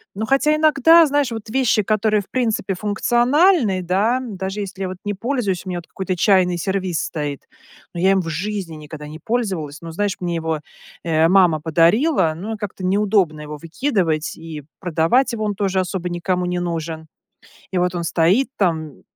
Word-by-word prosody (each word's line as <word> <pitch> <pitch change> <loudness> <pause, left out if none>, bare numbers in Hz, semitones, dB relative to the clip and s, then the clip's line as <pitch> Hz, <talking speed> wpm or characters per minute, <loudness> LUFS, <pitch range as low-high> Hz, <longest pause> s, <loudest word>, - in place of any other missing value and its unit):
Ну, 220 +2 -2
хотя 285 +5 +3
иногда, 315 +2 +6
знаешь, 285 -3 +1
вот 225 -1 -6
вещи, 235 -4 +2
которые 215 0 +1
в - - -17
принципе 225 -6 0
функциональны, 240 - +2
да, 205 +8 +1
даже 195 -3 -5
если 195 0 -7
я, - - -1
вот, 185 - -7
не 205 - -1
пользуюсь. 205 -5 -2
У - - -6
меня, 175 - -3
вот, 170 - -14
какой-то 185 -1 -3
чайный 180 -2 +3
сервиз 190 -2 -1
стоит, 145 -3 -4 0.5
но 170 - -4
я 190 +1 +4
им 190 -1 +3
в 165 - -7
жизни 185 0 -4
никогда 150 0 -9
не 155 +2 -9
пользовалась. 185 -10 -3
Но, 165 - -7
знаешь, 200 +3 -1
мне 175 -1 -2
его, 160 -2 -2 0.4
э, 160 -1 +3
мама 180 -5 +4
подарила, 170 - +3
ну, 210 +6 -5
как-то 200 -2 -6
неудобно 195 -5 +1
его 150 0 -7
выкидывать 165 - -1
и 160 -3 -8 0.2
продавать 175 +9 +2
его- 215 -2 -2
он 205 -1 -1
тоже 190 -1 0
особо 180 -1 -2
никому 180 +1 -1
не 180 0 -1
нужен. 165 -2 -4 0.7
И 185 - +1
вот 180 0 0
он 170 - -2
стоит 175 +11 +2
там 160 -6 -1
185 Hz, 180 wpm, -20 LUFS, 165-215 Hz, 0.7 s, иногда